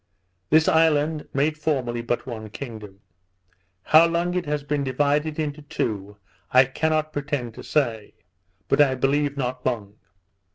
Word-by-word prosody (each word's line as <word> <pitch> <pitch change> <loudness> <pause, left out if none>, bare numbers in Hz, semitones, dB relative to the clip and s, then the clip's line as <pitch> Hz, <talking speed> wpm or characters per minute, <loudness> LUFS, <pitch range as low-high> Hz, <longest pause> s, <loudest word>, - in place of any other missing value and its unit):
This 160 +1 +4
island 155 -1 +2
made 150 +3 0
formerly 130 -6 -1
but 120 +1 -2
one 110 -4 -7
kingdom; 105 -5 -9 0.8
how 160 - +6
long 170 +1 -1
it 180 -3 -2
has 150 -1 -1
been 145 0 -1
divided 145 +3 0
into 150 -1 -3
two, 105 -7 -4 0.3
I 130 +1 +7
cannot 155 +3 -1
pretend 140 -5 -3
to - - -10
say; 115 -8 -1 0.5
but - - +3
I 135 -2 +4
believe 140 +2 0
not 125 -1 -3
long. 105 -5 -3
140 Hz, 140 wpm, -24 LUFS, 120-155 Hz, 0.8 s, I